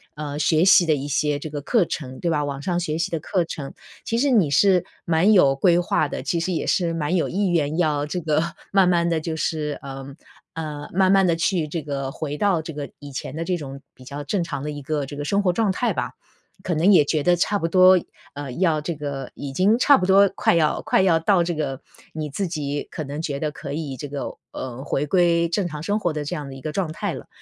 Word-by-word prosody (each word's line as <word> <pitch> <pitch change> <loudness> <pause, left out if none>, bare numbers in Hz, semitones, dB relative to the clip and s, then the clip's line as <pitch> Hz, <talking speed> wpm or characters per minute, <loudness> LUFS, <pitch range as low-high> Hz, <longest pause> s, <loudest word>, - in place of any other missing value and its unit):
呃， 150 -1 -5
学 155 +2 +3
习 190 -2 +7
的 155 - +3
一 140 0 -4
些 145 0 0
这 155 - -6
个 145 -1 -5
课 205 - +2
程， 130 -5 -6
对 170 - -1
吧？ 150 -2 +1
网 140 -1 -4
上 175 +2 -1
学 155 -2 -2
习 170 +3 -1
的 165 - -1
课 175 +3 0
程， 145 -4 -7 0.3
其 230 - -1
实 280 +3 +2
你 195 - +4
是 185 +4 +4 0.2
蛮 170 +5 +3
有 140 -9 +5
规 175 +4 +3
划 165 -3 +1
的， - - -5
其 170 - -1
实 170 +3 -2
也 - - -2
是 170 -3 +1
蛮 165 +2 -1
有 170 - +1
意 200 +2 0
愿 160 -3 0
要 150 -4 +1
这 180 +5 -3
个 155 -1 +1 0.3
慢 195 -2 +4
慢 170 -1 +2
地 165 -1 +1
就 160 0 -3
是， 155 -2 -2
呃， 135 -1 -7 0.5
呃， 150 -2 -5
慢 190 0 +3
慢 195 -1 +5
地 170 - +2
去 165 -1 0
这 160 +1 -4
个 140 -2 -4
回 150 0 -5
到 190 -4 +2
这 160 0 -7
个 145 -1 -6
以 145 -1 -10
前 130 +2 -6
的 165 - -3
这 180 0 -1
种 140 -3 -8
比 130 - -15
较 145 +2 -7
正 175 +4 -1
常 140 - -5
的 150 - -3
一 145 -1 -7
个 145 0 -2
这 145 - -8
个 145 - -4
生 200 +6 +1
活 180 - +3
状 220 -1 +1
态 240 +6 0
吧。 - - -3 0.5
可 180 - -1
能 170 +6 +4
也 155 -6 +6
觉 155 +1 0
得 175 +4 +3
差 205 +4 0
不 165 - 0
多 185 +1 +6 0.3
呃， 145 -2 -6
要 165 -3 +1
这 165 +2 -3
个 140 -3 -5
已 140 -1 -6
经 200 +8 +3
差 280 +3 +6
不 185 -7 0
多 195 +1 +6
快 - - +2
要 155 -2 +2
快 190 - +2
要 170 -4 +4
到 175 +1 +3
这 170 0 -2
个， 140 -4 -3 0.3
你 155 -2 -4
自 190 +5 -2
己 145 -3 -3
可 155 - -5
能 145 +2 -5
觉 145 -4 -3
得 150 0 -2
可 145 -1 -7
以 150 -3 -4
这 145 - -6
个， 140 0 -5 0.2
呃， 130 0 -6
回 145 +1 -1
归 170 0 +3
正 185 0 0
常 150 -2 -7
生 205 +5 0
活 175 -5 0
的 150 -1 -4
这 175 - -3
样 145 -3 -6
的 135 - -8
一 135 - -10
个 155 - -4
状 170 -1 -2
态 - - -3
了， - - -9
160 Hz, 275 characters per minute, -23 LUFS, 145-180 Hz, 0.5 s, 习